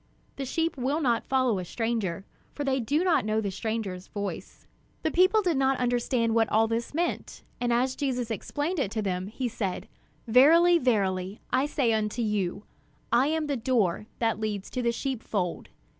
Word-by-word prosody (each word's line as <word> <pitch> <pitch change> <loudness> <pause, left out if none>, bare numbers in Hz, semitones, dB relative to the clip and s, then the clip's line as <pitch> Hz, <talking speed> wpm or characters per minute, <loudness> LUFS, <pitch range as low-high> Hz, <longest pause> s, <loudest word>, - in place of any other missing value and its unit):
The 275 - -3
sheep 325 +4 -1
will 270 +5 0
not 240 -7 +1
follow 255 -6 +2
a - - -3
stranger, 200 -2 -2 0.3
for 290 - -4
they 270 -1 +1
do 290 +8 +1
not 340 -9 +3
know 215 +1 0
the 205 -3 -2
stranger's 200 -3 -4
voice." 205 -1 -6 0.4
The 315 - +1
people 370 +6 +4
did 345 -6 +1
not 270 0 +2
understand 245 -1 +1
what 225 -1 +3
all 220 +1 +3
this 230 +4 -3
meant, 345 +2 -2 0.2
and 245 -1 0
as 255 +2 +1
Jesus 250 -5 -2
explained 295 - -2
it 260 - 0
to 220 -2 -1
them, 185 -1 -2
he 245 +4 -3
said: 210 -6 -3 0.4
"Verily, 330 +9 +6
verily, 195 - 0
I 260 +3 +3
say 255 -6 +1
unto 220 +2 -1
you, 205 -2 -1 0.5
I 240 +4 +4
am 315 0 0
the 285 -1 -1
door 220 -5 0
that 225 -2 0
leads 210 -2 -3
to 255 - -2
the 235 -1 +2
sheepfold. 225 -8 -3
235 Hz, 180 wpm, -27 LUFS, 215-270 Hz, 0.5 s, Verily